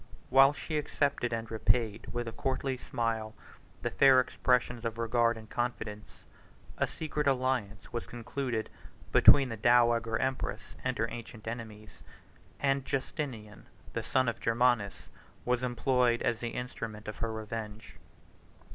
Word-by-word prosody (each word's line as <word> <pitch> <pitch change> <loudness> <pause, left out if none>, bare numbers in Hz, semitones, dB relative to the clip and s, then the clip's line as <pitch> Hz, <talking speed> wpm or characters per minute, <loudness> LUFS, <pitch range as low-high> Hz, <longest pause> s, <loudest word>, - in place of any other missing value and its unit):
While 135 +1 +8
she 150 +1 -3
accepted, 140 -4 0
and 115 -1 -3
repaid 110 -1 0
with 120 -1 -3
a - - -3
courtly 135 +2 -2
smile, 115 -3 -3 0.5
the - - -1
fair 135 -2 +6
expressions 125 -1 +1
of 115 -1 -3
regard 115 0 +2
and 110 -1 -11
confidence, 110 -3 -4 0.5
a - - +2
secret 150 -2 -3
alliance 125 -6 -1
was 120 - -3
concluded 120 0 -3 0.4
between 135 -2 +7
the 115 - -5
dowager 120 0 +4
empress 130 0 -3
and 130 0 -1
her 115 - +1
ancient 115 -2 -9
enemies; 110 -2 -7 0.6
and 135 -1 +1
Justinian, 130 -6 -4 0.3
the - - -1
son 130 -1 +1
of 115 - -1
Germanus, 115 -3 +1 0.4
was 125 0 +1
employed 125 -1 +1
as 115 -2 0
the 120 - -3
instrument 115 -3 -6
of 105 - -5
her 115 0 -2
revenge. 110 0 -6
120 Hz, 140 wpm, -31 LUFS, 110-130 Hz, 0.6 s, While